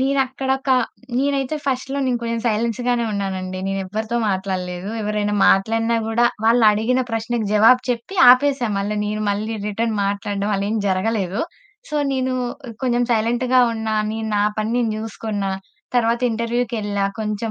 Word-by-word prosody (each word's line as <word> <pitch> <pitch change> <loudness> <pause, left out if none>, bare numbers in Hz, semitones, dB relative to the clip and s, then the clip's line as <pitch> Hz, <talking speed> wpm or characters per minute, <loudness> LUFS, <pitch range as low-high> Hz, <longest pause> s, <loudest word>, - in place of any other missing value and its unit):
నేనక్కడ 265 0 0
ఒక 265 0 -3 0.5
నేనైతే 275 +1 0
ఫస్ట్‌లో 265 +1 -1
నేను 250 -2 +1
కొంచెం 230 0 -2
సైలెన్స్ 230 +1 0
గానే 240 -1 +2
ఉన్నాను 195 -2 -2
అండి 185 0 -5
నేనెవ్వరితో 200 +4 -3
మాట్లాడలేదు, 185 -1 -3
ఎవరైనా 210 0 -1
మాట్లాడినా 225 +4 +2
కూడా 230 +2 +2 0.2
వాళ్ళడిగిన 225 +1 +4
ప్రశ్నకు 225 0 -2
జవాబు 225 +4 +6
చెప్పి 240 +10 -4 0.2
ఆపేసా. 260 -1 +3
మళ్ళీ 205 +2 -2
నేను 210 +1 -2
మళ్ళీ 215 +2 -2
రిటర్న్ 220 +2 -1
మాట్లాడడం 200 0 -2
అలా 195 0 -1
ఏం 225 - 0
జరగలేదు. 190 0 0 0.5
సో, 300 - -1 0.2
నేను 260 -1 0 0.5
కొంచెం 245 -1 +2
సైలెంట్‌గా 240 +3 +2
ఉన్నా 220 -1 -2 0.2
నేను 220 0 -3
నా 205 - +3 0.2
పని 215 +1 -1
నేను 240 -2 +1
చూసుకున్న. 215 -2 -4 0.5
తర్వాత 235 -1 +2
ఇంటర్వ్యూకెళ్ళా 230 -3 -1 0.2
కొంచెం, 215 +1 -2
225 Hz, 140 wpm, -21 LUFS, 205-245 Hz, 0.5 s, జవాబు